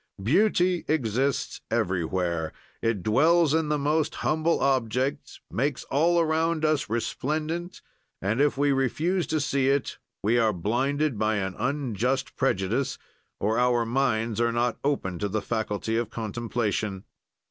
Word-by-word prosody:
"Beauty 180 - +3
exists 135 -2 0
everywhere; 85 -2 -1 0.3
it 115 -5 0
dwells 155 +7 +4
in 160 -1 +1
the 150 - +2
most 150 +2 0
humble 160 +2 +2
objects, 130 +1 0
makes 130 - -1
all 170 +5 +3
around 160 0 +1
us 155 -7 +1
resplendent 155 +9 -3 0.4
and, 105 +7 0
if 145 -2 +2
we 145 0 +3
refuse 155 +7 0
to 155 - 0
see 135 -2 +1
it, 140 0 0 0.2
we 115 +4 +3
are 110 -2 +3
blinded 130 - 0
by 110 0 +2
an 95 -2 -2
unjust 130 0 -1
prejudice, 120 0 0 0.4
or 110 +3 +1
our 120 -1 +3
minds 115 -2 0
are 120 0 +2
not 120 0 0
open 95 -11 -1
to 105 - -1
the 110 +2 0
faculty 110 0 -2
of 115 -2 -1
contemplation. 110 -3 -2
130 Hz, 135 wpm, -26 LUFS, 110-150 Hz, 0.4 s, dwells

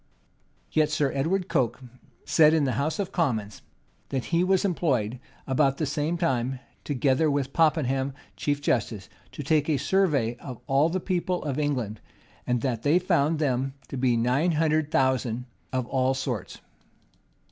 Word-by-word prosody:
Yet 155 -1 +3
Sir 150 -3 +1
Edward 175 +7 0
Coke[] 130 -8 0 0.5
said, 155 -1 +5
in 155 - +2
the 135 - +1
house 155 +2 -1
of 200 -3 -3
commons, 110 - -1 0.5
that 135 -3 -2
he 170 +1 +4
was 190 +1 +2
employed 130 - 0 0.3
about 135 0 +2
the 155 - 0
same 150 +4 -1
time, 130 -6 0 0.3
together 145 +2 +1
with 140 -1 -1
Popham, 140 -4 +2 0.2
chief 145 -1 -1
justice, 105 -6 -1 0.2
to 145 - -7
take 150 +1 +2
a 150 - +2
survey 140 -9 +1
of 125 -2 -8
all 140 +3 +3
the 185 +2 -1
people 180 0 -1
of 145 -1 -2
England, 125 -8 -2 0.5
and 125 -1 +1
that 120 -3 -1
they 150 +6 +4
found 165 -4 +2
them 135 -2 -1
to - - -5
be 125 -2 +2
nine 130 +9 +2
hundred 155 -1 +1
thousand 130 -4 +1 0.3
of 130 -2 -1
all 130 +1 +1
sorts. 125 -7 -4
140 Hz, 160 wpm, -26 LUFS, 130-160 Hz, 0.5 s, said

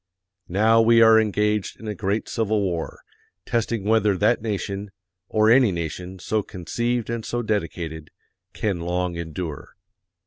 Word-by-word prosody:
Now 110 +5 +4
we 115 +1 +5
are 110 0 +7
engaged 105 -1 -1
in 110 - -9
a 105 - -2
great 105 +1 -2
civil 110 -1 0
war, 90 -5 -3 0.4
testing 115 -3 -1
whether 105 -2 +2
that 110 +5 +2
nation 100 -2 -3 0.4
or 110 0 +3
any 125 -3 +5
nation 90 +2 -5
so 105 +4 -1
conceived 120 +6 -3
and 115 -1 -3
so 120 +2 -3
dedicated 80 -7 -3 0.4
can 100 -5 -2
long 90 +1 -2
endure. 85 -2 -6
105 Hz, 140 wpm, -23 LUFS, 90-110 Hz, 0.4 s, are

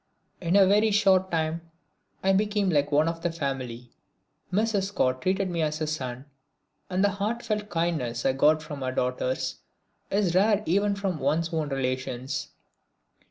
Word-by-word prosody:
In 175 +1 +1
a 200 -1 +7
very 210 +3 +4
short 195 -3 +3
time 165 0 -1 0.6
I 195 0 +4
became 205 -1 +1
like 145 -2 +1
one 150 +2 +3
of 165 0 -3
the 175 - -1
family. 130 -6 -4 0.6
Mrs. 205 0 +1
Scott 130 -10 0
treated 190 +3 +1
me 170 -2 -2
as 155 0 -1
a 155 - 0
son, 130 -4 -4 0.6
and 185 +1 +1
the 205 - +5
heartfelt 210 +1 -2
kindness 160 -9 -1
I 135 - +3
got 155 +3 +3
from 145 -3 -7
her 130 0 -1
daughters 125 0 -1 0.5
is 195 -3 +1
rare 205 +3 +3
even 200 +4 +2
from 195 -5 -2
one's 160 +5 0
own 155 -2 -1
relations. 130 0 -3
165 Hz, 160 wpm, -27 LUFS, 140-195 Hz, 0.6 s, a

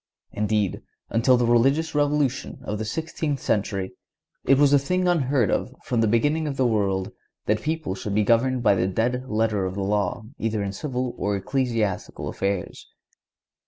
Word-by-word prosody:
Indeed, 105 -2 0 0.3
until 125 +3 +4
the 120 - +2
religious 135 +7 +3
revolution 145 -2 0
of 105 0 -4
the 110 - -2
sixteenth 155 +2 -3
century, 100 -4 -1 0.5
it 135 - +4
was 145 0 +5
a 140 - +7
thing 180 +6 0
unheard 140 - +2
of - - -1
from 120 -2 0
the 110 - +3
beginning 145 +8 +1
of 140 -2 -4
the 130 - +2
world, 100 -5 0 0.3
that 105 +1 +1
people 160 -7 -2
should 100 +1 -4
be 105 - +3
governed 120 +3 +2
by - - +5
the 95 -1 +1
dead 125 +6 -1
letter 110 -2 +1
of 95 - -5
the 100 - -2
law 100 +1 -1 0.2
either 110 -2 -1
in 100 -1 -3
civil 125 +1 -3
or 100 0 0
ecclesiastical 115 -2 -2
affairs. 100 -2 -3
115 Hz, 170 wpm, -24 LUFS, 105-140 Hz, 0.5 s, a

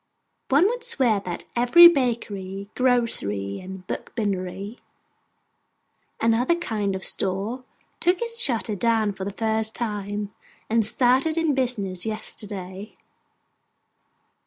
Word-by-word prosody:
One 285 +6 +5
would 480 +3 0
swear 260 - +2
that 180 -3 -6
every 245 +9 +8
'Bakery,' 205 - -1
'Grocery,' 165 - 0
and 185 0 -9
'Bookbindery,' 200 +1 -4 1.4
and 230 0 +3
other 250 +9 +2
kind 210 - -2
of 190 - -3
store, 205 +7 -1 0.3
took 355 +1 +2
its 465 0 -4
shutters 225 - +1
down 225 -3 +2
for 190 -1 -6
the 200 - -3
first 220 0 -1
time, 205 -2 -3 0.4
and 225 0 +3
started 260 +8 +2
in 325 -3 +2
business 210 -9 -1
yesterday. 205 -2 -6
220 Hz, 110 wpm, -24 LUFS, 195-255 Hz, 1.4 s, every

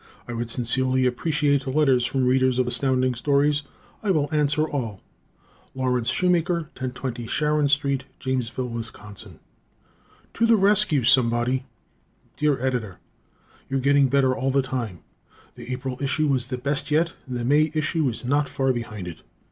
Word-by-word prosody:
I 120 - -5
would 115 0 -3
sincerely 130 +2 +1
appreciate 145 +1 +1
letters 130 -3 +3
from 135 -2 0
Readers 130 0 +3
of 130 - +2
Astounding 130 +1 +1
Stories. 145 +3 +2 0.4
I 210 - -2
will 150 -6 +2
answer 150 +1 +2
all. 115 -10 -4 0.8
Lawrence 125 -2 0
Schumaker, 175 -2 +1
1020 125 -2 -5
Sharon 150 +2 +1
St., 140 -2 +1
Jamesville, 130 -1 -2
Wis. 115 0 -4
To 105 - -9
the 230 - +6
Rescue, 200 - +3
Somebody! 125 +1 +2 0.7
Dear 150 -2 +1
Editor: 115 -8 -2 0.7
You're 135 0 0
getting 140 +1 +4
better 130 -1 +2
all 135 0 -1
the 135 0 +2
time. 120 -9 -4 0.5
The 125 - -9
April 130 0 -4
number 140 +1 +1
was 125 -2 -1
the 130 -1 -3
best 140 +4 -2
yet, 165 +3 +2
and 125 -1 -4
the 120 - -3
May 150 +4 +3
issue 155 -1 +1
is 120 +1 -6
not 145 +3 +1
far 135 -1 0
behind 110 -6 -6
it. 85 - -8
130 Hz, 150 wpm, -24 LUFS, 125-145 Hz, 0.8 s, the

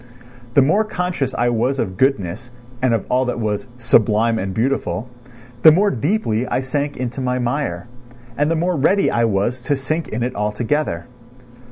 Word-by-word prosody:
The 140 - +7
more 195 +10 +3
conscious 180 -9 -2
I 120 0 +1
was 120 +4 0
of 95 -7 -2
goodness 115 -2 0 0.3
and 125 -2 +3
of 110 - -3
all 130 +1 +1
that 125 -1 -2
was 105 0 -2
"sublime 115 -1 +3
and 95 0 -3
beautiful," 120 +1 -1 0.5
the 160 - +9
more 200 +6 +3
deeply 130 - 0
I - - 0
sank 140 +2 -2
into 125 +1 -4
my 125 0 0
mire 125 +2 -2 0.5
and 145 +3 +1
the 165 - +1
more 175 +2 0
ready 190 +8 +2
I 115 0 +2
was 115 +4 0
to 145 +2 0
sink 155 +5 -2
in 115 +2 -3
it 125 +1 -2
altogether. 105 - -1
125 Hz, 175 wpm, -20 LUFS, 115-145 Hz, 0.5 s, the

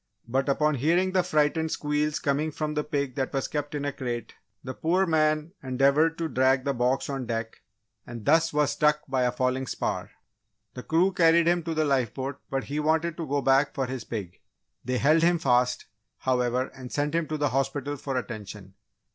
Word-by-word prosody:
But, 135 +4 0
upon 150 +2 +2
hearing 170 +8 +2
the 185 0 +3
frightened 160 -2 +1
squeals 150 0 -1
coming 145 +2 0
from 150 0 -3
the 150 0 -1
pig 140 -4 -2
that 130 +1 -2
was 135 -2 -1
kept 145 0 -4
in 145 -1 -3
a 145 - -2
crate, 120 -3 -5 0.3
the 130 - -5
poor 180 +7 +1
man 155 -1 +1
endeavoured 140 +4 +2
to 165 - -1
drag 130 -2 +2
the 140 - 0
box 125 +2 0
on 135 -3 -4
deck 115 -1 -3 0.5
and 120 -3 -8
thus 165 +2 +4
was 150 -1 +2
struck 150 0 +2
by 130 -1 0
a 125 - +2
falling 130 +1 -1
spar. - - -3 0.6
The 125 - -7
crew 175 +7 +2
carried 170 -2 +4
him 175 0 +3
to 165 -1 -2
the 155 0 +2
lifeboat 135 0 -1
but 135 -1 -1
he 145 +2 -3
wanted 160 +2 +1
to 165 -3 -4
go 140 0 0
back 135 +2 +3
for 135 - 0
his 130 -2 -5
pig! 100 -7 -6 0.4
They 125 +1 -1
held 155 +5 +4
him 170 +1 +4
fast, 125 -4 +1 0.3
however, 125 0 0
and 130 -1 -10
sent 145 +1 -1
him 165 -1 0
to 155 - -3
the 145 -1 +1
hospital 135 +2 -1
for 135 -1 -4
attention. 105 -5 -7
140 Hz, 195 wpm, -27 LUFS, 130-155 Hz, 0.6 s, thus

